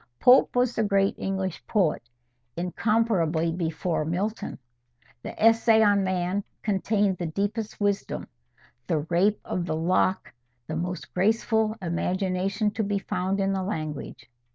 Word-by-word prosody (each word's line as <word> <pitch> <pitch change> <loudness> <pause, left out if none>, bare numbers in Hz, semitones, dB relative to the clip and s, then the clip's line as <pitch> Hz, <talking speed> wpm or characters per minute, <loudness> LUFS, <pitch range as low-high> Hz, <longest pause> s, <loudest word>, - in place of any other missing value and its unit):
Pope 250 +1 +6
was 245 -1 +2
the - - 0
great 200 -1 +2
English 190 -2 -3
poet, 185 -8 +1 0.6
incomparably 175 -3 +1
before 165 -1 -2
Milton. 190 +8 -3 0.6
The - - -8
"Essay 225 0 +5
on 205 -1 +4
Man" 185 +1 -1 0.2
contained 200 -1 +1
the 175 - -2
deepest 205 +6 -3
wisdom; 205 -1 -1 0.6
the 155 -2 +1
"Rape 200 +5 +3
of 175 -1 -3
the 155 - -1
Lock" 185 +3 +1 0.3
the 155 - -5
most 180 +2 -4
graceful 220 +2 +1
imagination 185 +4 -1
to 220 +1 -2
be 200 0 0
found 190 0 -2
in 195 0 +1
the 190 - -1
language. 155 -6 -5
195 Hz, 130 wpm, -26 LUFS, 175-210 Hz, 0.6 s, Pope